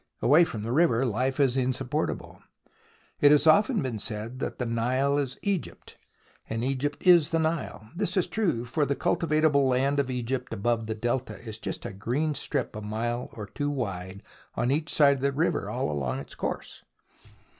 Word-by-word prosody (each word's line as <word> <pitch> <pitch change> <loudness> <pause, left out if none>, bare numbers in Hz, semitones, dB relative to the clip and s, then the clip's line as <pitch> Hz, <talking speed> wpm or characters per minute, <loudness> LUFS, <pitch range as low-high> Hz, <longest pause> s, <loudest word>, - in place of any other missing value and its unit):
Away 155 +6 +5
from 110 -9 -5
the 115 - -3
river, 135 -4 +3
life 130 +4 -1
is 135 -3 +3
insupportable. 130 +3 -2 0.8
It 145 - +6
has 150 0 +5
often 205 +8 +4
been 120 -5 -3
said 110 +4 -4
that - - -4
the 125 - -2
Nile 130 +5 +1
is 135 -2 -3
Egypt, 200 -4 -3 0.5
and 115 +1 -2
Egypt 135 +4 -2
is 170 -4 +6
the 165 - +1
Nile. 160 -8 -2
This 200 +2 -1
is 185 - +3
true, 170 - -1
for 125 +6 0
the 140 0 0
cultivable 155 -4 +2
land 135 +3 +2
of 135 -2 0
Egypt 125 -1 -3
above 115 +1 0
the 110 - -2
Delta 120 +3 -2
is 110 -2 -7
just - - -5
a - - -5
green 125 +10 -1
strip 145 - -2
a 105 - -5
mile 120 +3 -3
or 105 - -6
two 145 +8 -3
wide 100 -8 -4 0.3
on 125 - 0
each 155 +3 0
side 140 -2 +5
of - - -9
the 140 +1 +2
river 155 +5 0
all - - -2
along 65 -3 -2
its 70 - -8
course. - - -5
130 Hz, 185 wpm, -27 LUFS, 115-145 Hz, 0.8 s, It